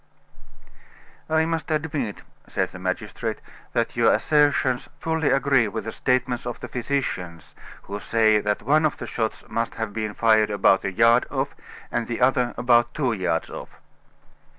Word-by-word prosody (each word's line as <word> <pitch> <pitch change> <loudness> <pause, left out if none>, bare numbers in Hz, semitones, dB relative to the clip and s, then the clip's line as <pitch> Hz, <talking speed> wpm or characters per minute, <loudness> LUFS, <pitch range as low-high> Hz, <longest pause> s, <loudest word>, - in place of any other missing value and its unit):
"I 160 0 +3
must 165 +1 -3
admit," 150 -8 -2 0.2
said - - -1
the 90 - -11
magistrate, 95 0 -3 0.3
"that - - 0
your - - +4
assertions 145 -4 +2
fully 160 -2 0
agree 135 -4 +3
with 110 +2 -4
the 110 - -5
statements 125 -1 0
of 120 - -5
the - - -7
physicians, 115 - -3 0.3
who 100 +1 -6
say 110 0 +3
that 105 0 -1
one 150 +6 +3
of 155 - 0
the - - -6
shots 110 0 -3
must 115 0 -2
have 110 -2 -4
been 110 -1 -3
fired 110 -2 +4
about 100 -2 +3
a 95 - -1
yard 115 +5 +4
off, - - -2 0.4
and 115 - -1
the 120 - -3
other 125 -1 +2
about 120 -1 +3
two 130 -6 0
yards 90 -5 -1
off." - - -9
120 Hz, 160 wpm, -24 LUFS, 110-140 Hz, 0.4 s, your